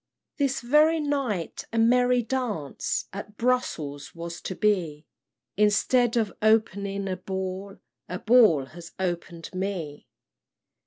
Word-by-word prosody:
"This 275 Hz, -2 st, +1 dB
very 300 Hz, +6 st, +4 dB
night 275 Hz, -, -2 dB
a 230 Hz, -, -3 dB
merry 245 Hz, +2 st, +4 dB
dance 220 Hz, -, -2 dB
At 205 Hz, +1 st, -8 dB
Brussels 155 Hz, -, -1 dB
was 170 Hz, 0 st, -7 dB
to 185 Hz, -, -5 dB
be; 170 Hz, -8 st, 0 dB, 0.5 s
Instead 230 Hz, +4 st, +3 dB
of 220 Hz, -4 st, 0 dB
opening 200 Hz, -2 st, +1 dB
a 185 Hz, -1 st, -2 dB
ball, 190 Hz, +1 st, -5 dB, 0.3 s
A 180 Hz, -, -3 dB
ball 215 Hz, -, +5 dB
has 170 Hz, +4 st, -12 dB
open'd 175 Hz, -2 st, -4 dB
me. 185 Hz, -6 st, -4 dB
200 Hz, 115 wpm, -26 LUFS, 175-240 Hz, 0.5 s, ball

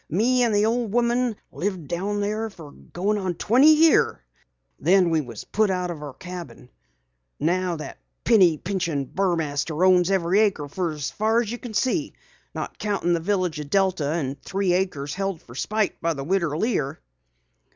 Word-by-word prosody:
Me 240 Hz, +9 st, +2 dB
and 235 Hz, -2 st, +3 dB
the 205 Hz, +1 st, +3 dB
old 230 Hz, -1 st, 0 dB
woman 240 Hz, 0 st, +1 dB, 0.2 s
lived 185 Hz, -5 st, -3 dB
down 200 Hz, +5 st, -2 dB
there 215 Hz, +2 st, -2 dB
fer 165 Hz, -8 st, -12 dB
goin' 200 Hz, +8 st, -3 dB
on 185 Hz, -3 st, -2 dB
twenty 260 Hz, -, +5 dB
years. 320 Hz, +1 st, +4 dB, 0.6 s
Then 180 Hz, +2 st, +4 dB
we 160 Hz, -1 st, +2 dB
was 120 Hz, -6 st, -8 dB
put 215 Hz, -1 st, +1 dB
out 180 Hz, -1 st, -1 dB
o' 170 Hz, -, -6 dB
our 145 Hz, -3 st, -8 dB
cabin. 175 Hz, -8 st, -9 dB, 0.7 s
Now 180 Hz, +3 st, 0 dB
that 155 Hz, -, -8 dB, 0.2 s
penny 185 Hz, -9 st, +5 dB
pinchin' 170 Hz, -6 st, -2 dB
Burmaster 165 Hz, -2 st, 0 dB
owns 180 Hz, -1 st, +4 dB
every 190 Hz, 0 st, +2 dB
acre 195 Hz, -9 st, +1 dB
fer 170 Hz, +2 st, -2 dB
as 215 Hz, +9 st, 0 dB
you 240 Hz, -, -5 dB
can 230 Hz, -4 st, -8 dB
see 290 Hz, +6 st, 0 dB, 0.4 s
not -, -, -5 dB
countin' 200 Hz, -5 st, 0 dB
the 170 Hz, -, +1 dB
village 180 Hz, -3 st, -1 dB
o' -, -, -3 dB
Delta 185 Hz, -1 st, +1 dB
an' 145 Hz, -4 st, -2 dB
three 195 Hz, -2 st, 0 dB
acres 165 Hz, -7 st, -1 dB
held 195 Hz, -3 st, -3 dB
fer 120 Hz, -, -15 dB
spite 215 Hz, -, -1 dB
by 165 Hz, -1 st, 0 dB
the 135 Hz, -, -5 dB
Widder 170 Hz, -2 st, 0 dB
Lear." 170 Hz, -, -1 dB
185 Hz, 170 wpm, -24 LUFS, 160-210 Hz, 0.7 s, twenty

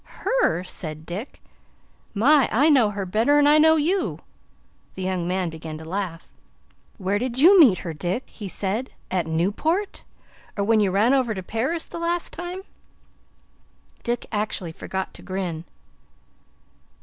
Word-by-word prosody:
"Her!" -, -, +2 dB
said 155 Hz, -4 st, -7 dB
Dick. 200 Hz, -, -7 dB, 0.7 s
"My, 275 Hz, +6 st, +4 dB
I 280 Hz, +8 st, +4 dB
know 250 Hz, -7 st, +5 dB
her 200 Hz, -1 st, -4 dB
better 225 Hz, +10 st, +2 dB
'n 290 Hz, -, +5 dB
I 300 Hz, +1 st, +6 dB
know 320 Hz, +1 st, +6 dB
you!" 345 Hz, +6 st, 0 dB, 0.8 s
The 190 Hz, -, -5 dB
young 185 Hz, -2 st, -1 dB
man 180 Hz, -2 st, -1 dB
began 160 Hz, -1 st, -7 dB
to 160 Hz, -, -10 dB
laugh. 180 Hz, -1 st, -4 dB, 0.7 s
"Where 195 Hz, +1 st, -1 dB
did 250 Hz, +1 st, -3 dB
you 360 Hz, +8 st, +7 dB
meet 245 Hz, -, +7 dB
her, 165 Hz, -, -3 dB
Dick?" 180 Hz, -, -3 dB
he 205 Hz, -, -9 dB
said. 205 Hz, +6 st, -3 dB, 0.2 s
"At 180 Hz, -3 st, 0 dB
Newport? 210 Hz, -, -1 dB, 0.5 s
Or 200 Hz, -, +1 dB
when 220 Hz, +2 st, +3 dB
you 205 Hz, -2 st, +3 dB
ran 210 Hz, +7 st, +3 dB
over 250 Hz, -5 st, +1 dB
to 190 Hz, -, -5 dB
Paris 260 Hz, -, -2 dB
the 335 Hz, -, -8 dB
last 340 Hz, 0 st, -2 dB
time?" 355 Hz, +2 st, -6 dB, 1.4 s
Dick 240 Hz, +1 st, -2 dB
actually 205 Hz, -5 st, -2 dB
forgot 190 Hz, +3 st, -5 dB
to -, -, -12 dB
grin. 180 Hz, -4 st, -4 dB
210 Hz, 150 wpm, -24 LUFS, 185-290 Hz, 1.4 s, you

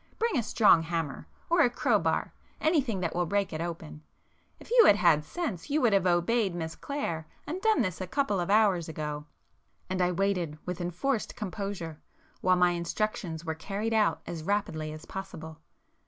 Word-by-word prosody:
Bring 460 Hz, -5 st, 0 dB
a 250 Hz, -, +3 dB
strong 215 Hz, -6 st, +5 dB
hammer,—or 165 Hz, -, -2 dB
a 260 Hz, -, +5 dB
crowbar,—anything 260 Hz, -, 0 dB
that 170 Hz, -2 st, -1 dB
will 175 Hz, -1 st, +1 dB
break 200 Hz, 0 st, 0 dB
it 155 Hz, -, -3 dB
open,—if 165 Hz, -, -10 dB
you 475 Hz, -2 st, +7 dB
had -, -, +7 dB
had 165 Hz, -6 st, +4 dB
sense 250 Hz, -, -4 dB
you 295 Hz, +2 st, +2 dB
would 235 Hz, -5 st, +4 dB
have 195 Hz, -2 st, +3 dB
obeyed 180 Hz, +3 st, +2 dB
Miss 165 Hz, -1 st, -4 dB
Clare, 170 Hz, -, -4 dB, 0.2 s
and 350 Hz, +5 st, -4 dB
done 435 Hz, -, +3 dB
this 185 Hz, -2 st, -3 dB
a 185 Hz, -, -3 dB
couple 240 Hz, -3 st, 0 dB
of 175 Hz, -, -2 dB
hours 200 Hz, -6 st, +3 dB
ago." 150 Hz, -1 st, -4 dB, 0.7 s
And 185 Hz, 0 st, 0 dB
I 180 Hz, 0 st, +3 dB
waited 180 Hz, -4 st, 0 dB
with 180 Hz, 0 st, -4 dB
enforced 195 Hz, +8 st, -2 dB
composure, 190 Hz, -6 st, -5 dB, 0.4 s
while 185 Hz, 0 st, +4 dB
my 180 Hz, 0 st, +4 dB
instructions 170 Hz, -1 st, -3 dB
were 160 Hz, -, -1 dB
carried 205 Hz, +7 st, -3 dB
out 215 Hz, -2 st, +2 dB
as 170 Hz, -2 st, -5 dB
rapidly 155 Hz, -4 st, -1 dB
as 155 Hz, 0 st, -9 dB
possible. 160 Hz, -4 st, -8 dB
180 Hz, 170 wpm, -29 LUFS, 165-220 Hz, 0.7 s, you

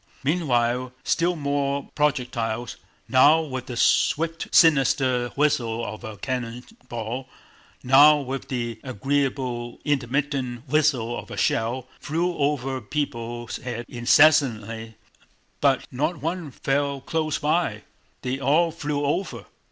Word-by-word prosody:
Meanwhile 125 Hz, -5 st, 0 dB
still 175 Hz, +1 st, +1 dB
more 140 Hz, -2 st, -2 dB
projectiles, 120 Hz, -5 st, -1 dB, 0.3 s
now 145 Hz, +5 st, +6 dB
with 130 Hz, -5 st, -5 dB
the 120 Hz, -, -6 dB
swift 165 Hz, +7 st, +2 dB
sinister 135 Hz, -5 st, +4 dB
whistle 120 Hz, -6 st, +1 dB
of 110 Hz, -, -7 dB
a 110 Hz, -3 st, -7 dB
cannon 125 Hz, +1 st, -4 dB, 0.3 s
ball, 120 Hz, +3 st, -5 dB, 0.5 s
now 145 Hz, +4 st, +7 dB
with 135 Hz, 0 st, -5 dB
the 120 Hz, -4 st, -3 dB
agreeable 130 Hz, -1 st, -2 dB
intermittent 135 Hz, -3 st, -1 dB
whistle 135 Hz, -5 st, +1 dB
of -, -, -8 dB
a -, -, -7 dB
shell, 120 Hz, +3 st, 0 dB
flew 170 Hz, +4 st, -1 dB
over 135 Hz, -3 st, -1 dB
people's 120 Hz, -3 st, -4 dB
heads 120 Hz, -1 st, -5 dB
incessantly, 115 Hz, -4 st, +3 dB, 0.6 s
but 135 Hz, -2 st, +2 dB
not 150 Hz, +7 st, -1 dB
one 165 Hz, +2 st, -3 dB
fell 140 Hz, +2 st, -1 dB
close 155 Hz, +2 st, -1 dB
by, 165 Hz, +3 st, 0 dB, 0.4 s
they 130 Hz, +1 st, -2 dB
all 155 Hz, +5 st, +3 dB
flew 150 Hz, -3 st, -2 dB
over. 170 Hz, +7 st, -2 dB
135 Hz, 115 wpm, -24 LUFS, 120-150 Hz, 0.6 s, now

